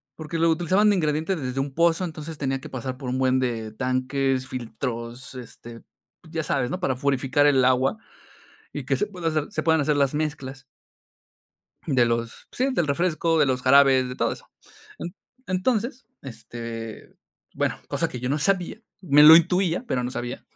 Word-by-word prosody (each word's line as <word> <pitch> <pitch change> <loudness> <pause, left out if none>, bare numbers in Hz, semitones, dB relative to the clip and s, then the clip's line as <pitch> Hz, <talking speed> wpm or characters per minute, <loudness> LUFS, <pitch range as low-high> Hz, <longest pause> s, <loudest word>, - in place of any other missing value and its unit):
Porque 160 +1 -5
lo 165 0 +3
utilizaban 185 +6 +3
de 205 - +3
ingrediente 155 +2 0
desde 130 -3 -4
un 135 0 -2
pozo, 170 +2 +2
entonces 160 -2 -6
tenía 135 -1 -1
que - - -10
pasar 130 0 -5
por 125 -1 -6
un 130 - -1
buen 130 0 +2
de 115 -4 -2
tanques, 130 +1 -1
filtros, 120 +1 -6
este, 120 -1 -10 0.5
ya 160 -1 -2
sabes, 130 -4 -1
¿no? 180 - -3
Para 130 -8 0
purificar 135 +2 +1
el 135 -3 +4
agua 130 - +2 0.8
y - - -5
que - - 0
se 210 - 0
pueda 180 -5 -4
hacer 155 -2 -1
se - - -2
puedan 160 -2 +3
hacer 150 0 +1
las 140 0 +1
mezclas 145 -3 -4 1.2
de 130 -5 +3
los, 115 0 -3
sí, 260 +2 0
del 175 -10 0
refresco, 165 +2 +1
de 150 - +4
los 130 -1 -1
jarabes, 135 -1 +5
de 125 - -7
todo - - 0
eso. - - -10 0.5
En 170 +2 -6 0.3
entonces, 230 +7 -1 0.2
este, 115 -2 -8 0.4
bueno, - - -1
cosa - - -1
que 125 - -7
yo 125 - -2
no 145 - +1
sabía, 190 +5 0 0.2
me 150 -4 +5
lo 155 +2 +11
intuía, 180 +4 +1
pero 125 - -1
no 125 - -3
sabía, 120 0 -6
140 Hz, 180 wpm, -24 LUFS, 130-165 Hz, 1.2 s, lo